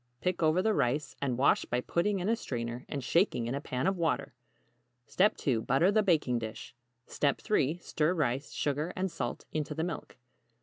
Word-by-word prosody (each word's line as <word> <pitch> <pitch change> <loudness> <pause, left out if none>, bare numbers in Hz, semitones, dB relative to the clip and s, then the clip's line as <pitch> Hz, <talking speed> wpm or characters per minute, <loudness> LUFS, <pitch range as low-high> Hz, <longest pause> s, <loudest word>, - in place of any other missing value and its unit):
Pick 180 +3 -1
over 160 +3 +3
the 220 0 +3
rice, 145 -1 0
and 130 -4 0
wash 135 +2 +4
by 120 - -1
putting 175 +10 0
in 180 - -2
a 225 - +3
strainer 120 - -4
and 140 -2 -3
shaking 165 - +2
in 120 - -2
a 140 - -2
pan 130 -3 -2
of 190 0 +1
water. 160 -4 0 0.7
2. 145 - +2
Butter 135 - +3
the 215 +1 +4
baking 155 - +2
dish. 110 -1 -7 0.3
3. 150 +1 +1
Stir 170 0 0
rice, 140 -3 -1
sugar 150 +4 -1
and 190 -1 -1
salt - - -4
into 150 -1 -3
the 160 - -1
milk. 170 -6 -5
150 Hz, 180 wpm, -31 LUFS, 130-180 Hz, 0.7 s, wash